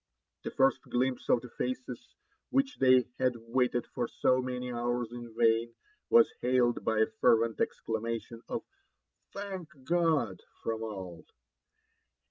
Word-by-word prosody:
The - - -3
first 135 0 +2
glimpse 130 +1 -1
of 120 - +4
the 125 - -10
faces 125 0 -5 0.3
which 270 0 +1
they 130 -1 +6
had 130 -1 +2
waited 120 +1 0
for 120 - -3
so 130 +2 +2
many 125 -1 -4
hours 120 0 -1
in 120 -2 -9
vain 115 0 +3 0.3
was 465 0 +6
hailed 125 -1 +2
by 110 - +1
a - - +6
fervent 115 0 +2
eidamation 115 +1 -3
of 240 - -3 0.7
Thank 195 -4 -6
God 155 - +1
!" - - -33
from 115 -1 -2
all. 95 -6 -7
120 Hz, 135 wpm, -31 LUFS, 115-130 Hz, 0.7 s, they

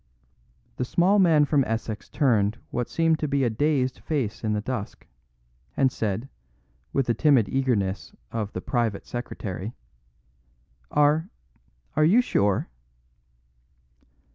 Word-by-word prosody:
The - - -1
small 180 +10 +3
man 160 -5 +5
from 145 -1 +2
Essex 110 -1 -4
turned 110 -6 +2
what 120 0 -2
seemed 165 -1 +2
to 155 - -1
be 140 -1 +1
a 120 - +1
dazed 130 +1 0
face 130 -10 -3
in 110 -1 0
the 105 - 0
dusk, 110 -1 -5 0.7
and 130 -1 +3
said, 110 +3 -2 0.6
with 135 - +1
the 120 - +1
timid 130 -4 +4
eagerness 110 -8 -1 0.2
of 110 -3 -3
"The 90 - -4
Private 115 -4 -1
Secretary": 105 -4 -5 1.2
"Are 150 +4 +2 0.7
are 155 - +3
you 185 +10 +5
sure?" 100 - +1
125 Hz, 125 wpm, -25 LUFS, 110-150 Hz, 1.2 s, man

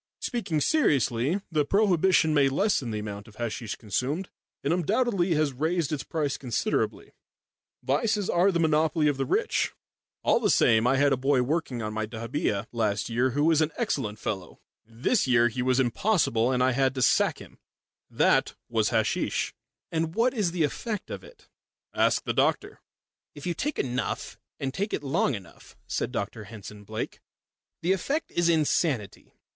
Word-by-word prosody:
Speaking 215 - -2
seriously, 145 - +2
the 155 -2 +2
prohibition 185 -2 +3
may 140 -2 +4
lessen 145 - +1
the 110 - -3
amount 105 0 -6
of 110 - -16
hasheesh 115 -1 -4
consumed, 130 - -2 0.3
and - - +1
undoubtedly 190 -1 +1
has 150 -2 +1
raised 160 +3 -1
its 150 -3 -1
price 150 -4 -2
considerably 125 -4 -1 0.7
vices 190 - +1
are 180 +3 +3
the 170 - 0
monopoly 160 -1 +2
of 145 -2 +1
the 135 -1 -1
rich. - - 0 0.5
All - - +3
the - - +1
same, 115 +1 +4
I 135 +2 +3
had 140 0 +4
a - - +1
boy 135 0 +2
working 135 -4 -2
on 105 0 -3
my 110 0 -2
dahabeeah 110 -2 -2
last 110 -3 -1
year 125 +3 +2
who 145 - +3
was 160 0 +4
an 155 0 +1
excellent 110 -6 -1
fellow. 95 -5 -5 0.2
This 115 - 0
year 120 -1 +4
he 125 +2 -3
was 130 +1 +2
impossible, 130 - +2
and 125 -1 +2
I 130 - +3
had 135 +1 +1
to 130 - 0
sack - - +3
him. - - -14 0.5
That - - +2
was 110 -2 +1
hasheesh." 110 -2 0 0.4
"And 165 0 -1
what 240 +2 +2
is 210 -8 +1
the 170 -2 0
effect 210 - -3
of - - -6
it?" 485 0 -17 0.5
"Ask - - +2
the - - -2
doctor." - - 0 0.6
"If 145 - -9
you 175 - 0
take 290 - -3
enough 125 -1 -3 0.2
and 135 -1 -3
take 200 +6 -2
it 145 - -2
long 140 -1 +1
enough," 95 -4 -13
said - - -2
Dr 110 -2 -4
Henson 105 0 -10
Blake, 110 +2 -5 0.6
"the 175 - +2
effect 280 - -2
is 175 0 +2
insanity. 150 - 0
140 Hz, 170 wpm, -27 LUFS, 115-170 Hz, 0.7 s, may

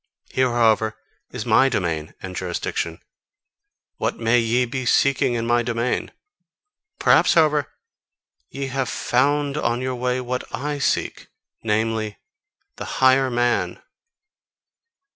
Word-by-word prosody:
Here, 130 -1 +2
however, 110 -2 +2 0.3
is - - -6
MY 135 0 +4
domain 85 -9 -2
and 95 -1 -6
jurisdiction: 85 -2 -3 1.0
what - - -2
may 115 +1 +3
ye 120 +2 +1
be 130 +2 -4
seeking 135 +1 +2
in 115 -1 -2
my 120 0 +2
domain? 120 +1 -2 0.9
Perhaps, - - +4
however, 150 -3 +3 0.8
ye 140 0 -5
have 135 -1 -2
FOUND 145 +3 +1
on 120 -5 0
your 130 0 -2
way 125 +1 -1
what 125 0 -3
I 145 +1 -3
seek: 115 -6 -1 0.3
namely, 110 -1 -1 0.6
the - - -6
higher 130 0 +4
man." 120 0 0
120 Hz, 120 wpm, -22 LUFS, 115-135 Hz, 1.0 s, MY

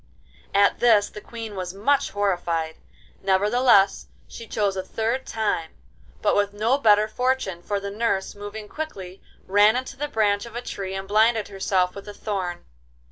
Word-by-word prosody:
At 200 0 +4
this 215 -4 +4
the 210 - -10
Queen 225 -2 -8
was 185 -1 -5
much 275 +8 +2
horrified; 175 -5 -1 0.4
nevertheless, 200 +1 +3 0.2
she 230 - -10
chose 205 -3 0
a 190 - -1
third 225 +7 -2
time, 205 -7 -2 0.5
but - - +3
with 205 0 +1
no 230 +6 +2
better 210 -4 +5
fortune, 250 -6 -1
for 200 +3 -2
the 200 0 -5
nurse, 205 -2 -1
moving 205 +1 -8
quickly, 195 -12 -7 0.2
ran 205 +3 +5
into 260 +2 -3
the 295 +2 -2
branch 210 -4 +1
of 235 - -12
a 240 - -3
tree 195 -4 -5
and 195 0 -5
blinded 220 +1 +3
herself 190 -2 0
with 200 0 -10
a 205 - -8
thorn. 185 -5 -4
205 Hz, 165 wpm, -24 LUFS, 195-225 Hz, 0.5 s, better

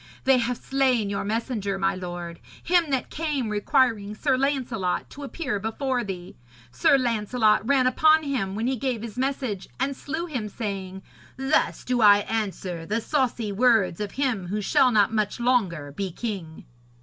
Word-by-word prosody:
They 265 -1 +4
have 245 0 -1
slain 255 -6 +1
your 200 - -2
messenger, 210 -2 -2
my 195 0 +1
lord, 175 -2 -6 0.2
him 345 -2 +2
that 265 -2 -1
came 295 -7 -2
requiring 210 -1 +1
Sir 265 +3 +1
Lancelot 255 -9 -1
to 290 - -10
appear 275 -5 -3
before 245 +4 -2
thee. 180 -3 -7 0.3
Sir 125 - +4
Lancelot 220 -3 +2
ran 275 -2 +3
upon 310 +5 +4
him 235 -10 -2
when 220 +2 -2
he 260 +1 0
gave 240 -2 -2
his 225 -3 -7
message 255 -6 -2
and 270 +1 0
slew 315 +6 -4
him, 250 -10 -4
saying, 190 -3 -5 0.3
"Thus 270 +3 +1
do 250 -1 0
I 205 -1 +7
answer 195 -6 -3
the 210 +7 -1
saucy 240 -5 -1
words 220 -5 +3
of 205 -1 -4
him 250 -10 -1
who 205 +4 -2
shall 250 +5 +3
not 215 -1 +3
much 215 +1 -1
longer 195 - 0
be 190 +6 -3
king."' 185 -6 -6
225 Hz, 165 wpm, -25 LUFS, 200-265 Hz, 0.3 s, I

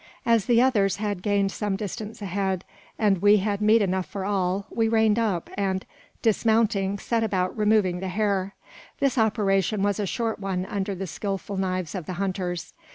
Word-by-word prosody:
As 230 -3 +3
the 235 -2 +5
others 200 -7 +2
had 205 -3 -3
gained 200 -1 +1
some 205 -1 -2
distance 210 +2 -6
ahead, 190 -1 -2 0.3
and 200 -5 +2
we 205 +1 +6
had 205 +1 -1
meat 215 +1 +5
enough 185 -1 -1
for 195 -2 -5
all, 195 -1 0
we 225 -1 +1
reined 220 -1 +3
up, 200 -7 0
and, 190 -1 -1 0.4
dismounting, 220 -3 +2
set 230 +3 -1
about 185 -4 0
"removing 210 -4 +2
the 190 - -4
hair." 195 0 -1 0.4
This 275 -3 +1
operation 205 -2 +1
was 205 0 +1
a 205 - -1
short 225 +2 -2
one 190 -2 -2
under 195 0 -3
the 195 +1 -4
skilful 195 +3 -4
knives 185 -3 -2
of 180 -6 -5
the 185 - -3
hunters. 180 -2 -3
200 Hz, 175 wpm, -25 LUFS, 190-215 Hz, 0.4 s, we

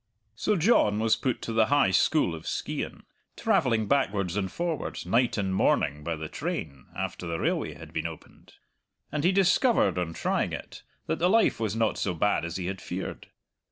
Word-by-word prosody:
So 210 - +1
John 165 - +3
was 110 0 +3
put 130 -2 -2
to 115 - -3
the 110 -1 +4
High 145 -8 +3
School 95 - +3
of 80 - -8
Skeighan, - - -4 0.3
travelling 110 -4 +2
backwards 100 -8 +1
and 95 -3 -1
forwards 170 -3 -3
night 120 0 +2
and 95 -2 -1
morning 75 -5 +1
by 85 +1 -2
the 80 0 -6
train, 70 -3 -5
after 90 - -4
the 85 0 -2
railway - - -1
had - - -12
been - - -1
opened. - - -13 0.6
And 150 -1 -2
he 180 - +4
discovered, 195 - +3
on 85 -2 -2
trying - - -1
it, - - -7 0.2
that 160 - -2
the 175 +2 +3
life 225 - +3
was 110 -1 -1
not 115 -1 +1
so 95 -3 -1
bad 100 0 +1
as 85 +1 -5
he 90 - -4
had 95 0 -4
feared. 95 +2 -6
105 Hz, 190 wpm, -27 LUFS, 90-145 Hz, 0.6 s, the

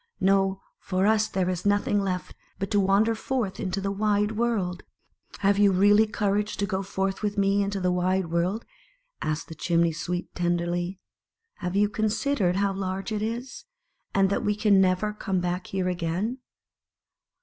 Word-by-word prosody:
No; 195 0 +2 0.2
for 185 0 0
us 220 0 +3
there 185 -1 -1
is 180 -1 -2
nothing 205 0 +2
left 185 -2 -3 0.2
but 195 0 -4
to 205 - +3
wander 200 +4 +3
forth 225 -3 -2
in 190 - -2
to 190 +2 -2
the 195 0 -2
wide 210 +1 +1
world." 215 -6 -1 0.3
" - - -18
Have 200 0 +4
you 205 -1 +6
really 205 +3 +5
courage 210 0 -1
to 200 - 0
go 195 -1 -2
forth 195 0 -2
with 210 -1 -2
me 200 0 +3
into 200 0 -1
the 180 -1 +1
wide 180 -1 0
world?" 180 +6 0 0.6
asked 155 +1 -2
the - - -8
Chimney 170 +1 +1
sweep 175 +3 -4
tenderly. 175 +1 -1 0.3
" 455 0 -56
Have 180 -1 -3
you 205 +1 +4
con 215 +1 -1
sidered 215 -5 +1
how 200 0 +1
large 195 +2 -3
it 210 -1 -1
is, 240 +4 -4 0.5
and 195 0 +2
that 240 - 0
we 210 -1 +1
can 205 -2 +4
never 190 +3 +1
come 195 -3 -2
back 180 +1 -2
here 190 -1 -2
again?" 180 +8 -2
195 Hz, 180 wpm, -26 LUFS, 185-210 Hz, 0.6 s, you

